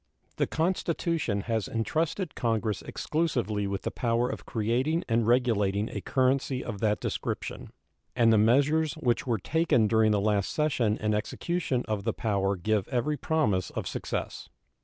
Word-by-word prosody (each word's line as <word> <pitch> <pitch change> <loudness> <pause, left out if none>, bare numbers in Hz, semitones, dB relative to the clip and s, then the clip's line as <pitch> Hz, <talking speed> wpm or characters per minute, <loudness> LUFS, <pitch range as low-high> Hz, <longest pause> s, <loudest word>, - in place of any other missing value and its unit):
The - - +1
Constitution 165 - 0
has 110 0 -1
intrusted 160 - -1
Congress 110 -4 -1
exclusively 120 -11 -1
with 100 0 -3
the - - -2
power 120 +1 0
of - - -6
creating 125 +9 0
and 115 -1 +1
regulating 110 -4 +2
a - - -5
currency 130 0 +1
of 110 -4 -5
that 105 0 +1
description, - - -4 0.4
and 115 -2 +5
the - - +5
measures 145 +7 +3
which 125 +2 0
were 120 -2 +1
taken 155 - +2
during 110 0 +3
the 105 -1 +2
last 100 -1 +1
session 130 -8 +1
in 105 0 0
execution 130 +5 -1
of 105 -2 -2
the 115 0 0
power 100 -2 0
give 105 +2 0
every 140 +4 0
promise 110 - 0
of - - -4
success. - - -4
115 Hz, 155 wpm, -28 LUFS, 105-145 Hz, 0.4 s, and